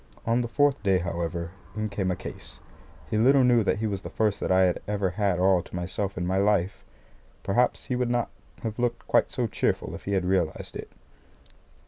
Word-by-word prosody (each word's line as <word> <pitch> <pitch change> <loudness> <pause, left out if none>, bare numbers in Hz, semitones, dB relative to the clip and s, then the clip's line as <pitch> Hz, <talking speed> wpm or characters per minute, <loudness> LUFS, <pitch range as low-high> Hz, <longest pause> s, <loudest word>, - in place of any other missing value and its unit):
On 115 +2 +2
the 120 - -2
fourth 145 +3 +2
day, 95 -2 +3
however, 85 -1 -3 0.2
in 110 0 -1
came 100 -2 -2
a 90 - 0
case. - - -8 0.5
He 110 - +1
little 135 +3 +5
knew 120 -2 +4
that 100 - +1
he 110 - -2
was 100 -3 -2
the - - -7
first 105 -2 0
that - - -1
I 95 0 +5
had 90 -1 +1
ever 100 -3 0
had 100 -2 0
all 95 0 +4
to - - -11
myself 95 +3 -3
in 90 - -1
my 95 +2 0
life. 100 -2 +1 0.6
Perhaps 120 +6 +2
he 125 - -2
would 125 -1 0
not 120 -1 0 0.3
have 110 0 -4
looked 120 -1 -1
quite - - +3
so - - -1
cheerful - - -1
if - - -9
he 100 - -1
had 95 -2 +1
realised 90 -4 -1
it. - - -7
100 Hz, 210 wpm, -26 LUFS, 90-115 Hz, 0.6 s, little